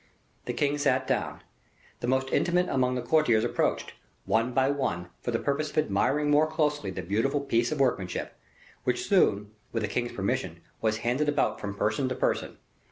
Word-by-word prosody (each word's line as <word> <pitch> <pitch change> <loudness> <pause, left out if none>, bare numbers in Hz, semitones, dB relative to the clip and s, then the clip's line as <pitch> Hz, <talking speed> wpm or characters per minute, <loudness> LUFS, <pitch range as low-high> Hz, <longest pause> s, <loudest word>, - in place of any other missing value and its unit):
The - - -2
king 145 0 0
sat 130 -2 +2
down. - - -2 0.6
The 120 - -3
most 130 +1 +1
intimate 180 +1 +2
among 125 -1 +1
the 125 - -2
courtiers 120 -5 +3
approached, 120 - -1 0.3
one 115 +3 +1
by 135 +2 +2
one, 90 -12 -2
for - - -4
the 115 - +1
purpose 145 +4 -1
of - - -12
admiring 145 +3 +2
more 150 +2 +5
closely 150 - 0
the 95 -1 -5
beautiful 110 - 0
piece 120 -3 +1
of 155 - -2
workmanship, 110 -9 0 0.5
which - - -1
soon, 105 +1 +3 0.2
with 115 -2 -2
the - - 0
king's 120 -1 -2
permission, 95 -5 -2 0.2
was 110 -1 +1
handed 135 +5 +1
about 135 -7 0
from 100 -1 -4
person 110 +6 0
to 130 - -2
person. - - -1
130 Hz, 180 wpm, -28 LUFS, 110-145 Hz, 0.6 s, more